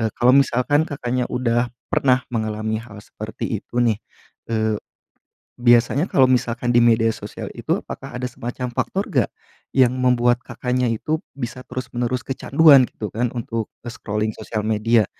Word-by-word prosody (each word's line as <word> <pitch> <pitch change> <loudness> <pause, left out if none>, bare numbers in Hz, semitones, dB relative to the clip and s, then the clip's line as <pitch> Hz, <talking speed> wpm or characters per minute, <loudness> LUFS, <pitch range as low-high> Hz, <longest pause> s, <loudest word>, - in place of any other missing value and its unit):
eee, 110 - +1
kalau 125 +1 +5
misalkan 140 +3 +3
Kakaknya 125 -3 -2
udah 120 -1 0 0.2
pernah 130 -1 +3
mengalami 110 -1 -2
hal 115 -3 -12
seperti - - -7 0.2
itu, 120 0 -1
nih, 110 -3 +1 0.5
eee, 110 -2 0 0.7
biasanya 120 +6 +3
kalau 135 - +5
misalkan 120 -1 +1
di 120 - +6
media 115 -1 +4
sosial - - -8
itu - - -1
apakah - - -7
ada 125 - -3
semacam 125 0 -5
faktor - - -1
nggak, - - +1 0.4
yang 130 -2 +3
membuat 125 -1 +2
Kakaknya 125 -1 -1
itu 155 +8 -1 0.2
bisa 125 0 -5
terus 130 0 -6
menerus 120 +1 -2
kecanduan 135 0 +5
gitu 105 - -7
kan 120 +2 0
untuk, 115 -1 -3 0.2
e - - -4
scrolling 105 +1 -2
sosial 110 -1 -4
media, 110 0 +3
120 Hz, 155 wpm, -21 LUFS, 115-125 Hz, 0.7 s, di